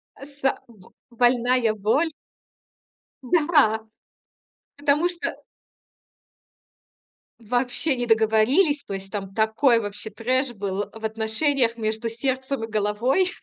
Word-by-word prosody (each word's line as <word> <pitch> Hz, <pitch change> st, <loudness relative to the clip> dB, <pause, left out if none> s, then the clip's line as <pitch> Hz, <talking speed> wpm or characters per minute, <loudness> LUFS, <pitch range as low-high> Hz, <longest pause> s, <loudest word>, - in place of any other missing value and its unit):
А 275 Hz, -, -12 dB
с 285 Hz, -1 st, -15 dB
а 270 Hz, -, +2 dB
б 210 Hz, -6 st, -18 dB, 0.2 s
больная 245 Hz, -1 st, +2 dB
боль. 220 Hz, +11 st, +1 dB, 1.1 s
Да, 275 Hz, -7 st, +2 dB, 0.9 s
потому 290 Hz, +4 st, +2 dB
что 350 Hz, -1 st, -3 dB, 2.1 s
Вообще 245 Hz, +5 st, 0 dB
не 245 Hz, -1 st, -2 dB
договорились. 230 Hz, -, +3 dB
То 200 Hz, -, -7 dB
есть 195 Hz, 0 st, -6 dB
там 195 Hz, -2 st, -5 dB
такой 225 Hz, +4 st, +3 dB
вообще 205 Hz, 0 st, -6 dB
трэш 255 Hz, +3 st, -1 dB
был 200 Hz, -1 st, -3 dB
в 225 Hz, 0 st, -12 dB
отношениях 230 Hz, +3 st, 0 dB
между 220 Hz, +1 st, -2 dB
сердцем 260 Hz, +2 st, -2 dB
и 225 Hz, -, -3 dB
головой 220 Hz, -, +1 dB
235 Hz, 110 wpm, -24 LUFS, 220-275 Hz, 2.1 s, договорились